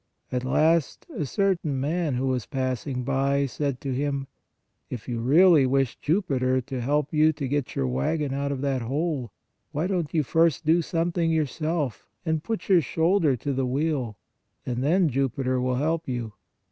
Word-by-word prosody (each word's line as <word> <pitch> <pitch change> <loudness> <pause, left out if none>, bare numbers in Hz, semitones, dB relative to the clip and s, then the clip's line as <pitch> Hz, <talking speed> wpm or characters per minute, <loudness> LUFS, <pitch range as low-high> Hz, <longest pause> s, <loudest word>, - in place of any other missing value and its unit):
At 125 0 -1
last 155 +4 +2
a 150 - -2
certain 170 -7 0
man 155 0 0
who 130 +2 -1
was 130 -4 -1
passing 130 -1 -2
by, 140 +2 +1
said 140 -1 -2
to 135 -2 -2
him: 140 +1 -1 0.3
" - - -50
If 120 -4 -7
you 120 -2 -2
really 150 +3 +5
wish 135 -2 +1
Jupiter 135 -7 +1
to 130 -1 -5
help 145 +4 0
you 155 +1 +5
to 140 -2 -4
get 145 0 -2
your 65 - 0
wagon 135 - -1
out 140 +1 -1
of 135 -2 -3
that 135 -2 0
hole, 135 -1 -2 0.4
why 155 +4 -1
don 180 -3 0
t 155 - -4
you 155 - +3
first 160 +2 +2
do 165 +3 +4
something 165 +1 0
yourself 155 - -1 0.2
and 160 -1 0
put 225 -1 -3
your 185 -3 +5
shoulder 160 0 +2
to 140 +4 -3
the 130 -1 0
wheel, 130 -5 -1 0.5
and 125 0 -2
then 175 +5 +3
Jupiter 130 -1 0
will 125 0 0
help 160 +4 -1
you." 120 -4 -3
140 Hz, 180 wpm, -26 LUFS, 130-160 Hz, 0.5 s, really